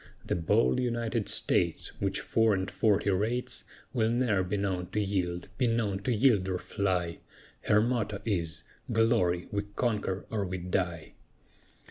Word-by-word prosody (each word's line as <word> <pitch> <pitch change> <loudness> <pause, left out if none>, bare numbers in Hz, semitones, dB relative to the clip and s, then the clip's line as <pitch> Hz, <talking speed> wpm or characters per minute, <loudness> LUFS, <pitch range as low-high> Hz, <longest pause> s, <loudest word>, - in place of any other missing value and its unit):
The - - -1
bold 70 -6 +2
United 120 -2 -1
States, - - +1
Which 100 0 0
four 110 -2 +3
and 95 +1 -2
forty 105 -2 +2
rates, 110 +6 -1 0.3
Will 110 -3 +2
ne'er 115 -5 +2
be 95 +3 -1
known 95 -3 -1
to 105 - +1
yield 90 -4 -1
be 125 - +3
known 110 -4 0
to 105 +5 -2
yield 110 -5 +3
or 95 - 0
fly, 90 -4 -1 0.5
Her 105 - +5
motto 110 -4 -1
is 85 -7 -1 0.3
"Glory! 110 -7 +2
we 100 - 0
conquer 105 -5 -1
or 105 -3 0
we 95 -1 -3
die." 90 -2 -2
100 Hz, 150 wpm, -30 LUFS, 90-115 Hz, 0.5 s, Her